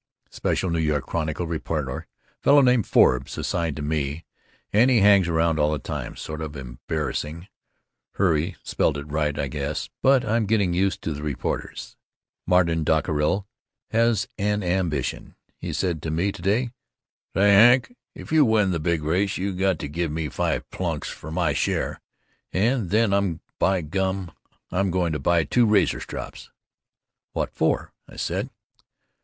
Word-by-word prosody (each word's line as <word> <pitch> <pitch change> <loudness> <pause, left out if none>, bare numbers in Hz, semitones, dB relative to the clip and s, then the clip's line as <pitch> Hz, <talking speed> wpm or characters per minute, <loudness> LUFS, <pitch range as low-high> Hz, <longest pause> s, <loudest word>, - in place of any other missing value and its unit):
Special 95 - -1
NY 80 -3 +1
Chronicle 80 +4 -3
reporter, 80 -2 -3 0.3
fellow 145 0 +6
named 125 -4 +3
Forbes, 65 +1 +3
assigned 85 -4 -1
to 75 - -5
me, 75 +1 -2 0.5
and 115 +5 +5
he 125 - +4
hangs 100 -3 +5
around 80 -1 +1
all 75 0 +3
the 75 - 0
time, - - -5
sort 80 0 -6
of 75 -1 -5
embarrassing 75 +6 -4 0.7
(hurray, 85 -1 +1
spelled 70 - 0
it 70 - -5
right, 75 0 -1
I 70 - -1
guess) 70 +2 -4
but 135 -1 +4
I'm 110 0 +1
getting 100 -4 +2
used 95 +1 0
to 80 - -2
the 75 - -7
reporters. 75 -3 -4 0.5
Martin 85 -3 +3
Dockerill 80 +4 +1 0.5
has 115 -2 +2
an 105 0 0
ambition! 90 -6 -2 0.2
He - - -4
said 85 -5 -1
to 80 - -4
me 85 +6 0
to 85 - -10
day, 110 +7 +1 0.6
"Say, 100 +1 +5 0.2
Hawk, 130 - -7 0.2
if - - -10
you 155 -1 +6
win 110 -6 +3
the 85 - -1
big 80 0 0
race 95 +6 0
you 95 +1 -2
got 95 -1 +1
to - - -5
give 80 +2 -2
me 80 -1 -2
five - - -1
plunks - - -3
for - - -9
my 80 -2 0
share - - -1 0.5
and 110 0 +1
then 100 -5 +2 0.2
by 95 -2 +2
gum 95 +3 -2 0.4
I'm 95 +1 +1
going 90 -2 0
to 75 - -2
buy 85 +4 +2
two 115 - +3
razor 105 -4 +3
strops." - - -8 0.8
"What - - -2
for?" - - 0 0.2
I - - -13
said. - - -2
85 Hz, 160 wpm, -24 LUFS, 75-100 Hz, 0.8 s, fellow